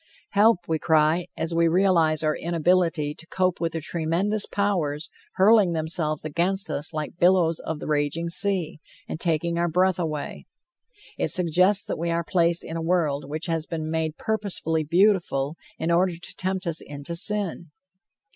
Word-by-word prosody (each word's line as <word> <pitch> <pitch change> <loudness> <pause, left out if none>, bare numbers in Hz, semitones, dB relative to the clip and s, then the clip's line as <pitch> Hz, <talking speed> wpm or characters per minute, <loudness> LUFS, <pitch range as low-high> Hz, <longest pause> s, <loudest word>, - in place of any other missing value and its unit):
Help! 205 -4 +3
we 160 -1 0
cry, 160 +2 +2
as 165 +1 -2
we 170 0 +3
realize 165 -3 +2
our 155 0 +1
inability 170 -2 +1
to 165 - -12
cope 185 -1 -1
with 165 -1 -1
the 165 - -2
tremendous 170 +7 -1
powers 170 -7 -1 0.2
hurling 195 -2 +4
themselves 155 -1 -1
against 180 +6 -1
us 150 +4 -1
like 155 +2 -5
billows 175 -2 +3
of 160 - -4
the - - -8
raging 150 +2 -1
sea, 175 -2 0 0.3
and - - -5
taking 170 0 0
our 175 0 +1
breath 185 +2 +2
away. 155 -4 -4 0.7
It - - +1
suggests 180 +3 +3
that - - -4
we 170 +1 -2
are 170 0 0
placed 170 -1 +1
in 165 - -5
a - - -3
world 160 -5 0
which 155 +3 -4
has 165 -2 -2
been 155 -2 -4
made 160 -1 -2
purposely 195 -7 -1
beautiful, 170 -4 +1 0.2
in 165 - -1
order 175 +1 +2
to 175 - -7
tempt 190 0 -3
us 165 -2 -1
into 145 +3 -6
sin. 190 -2 0
170 Hz, 165 wpm, -24 LUFS, 155-185 Hz, 0.7 s, hurling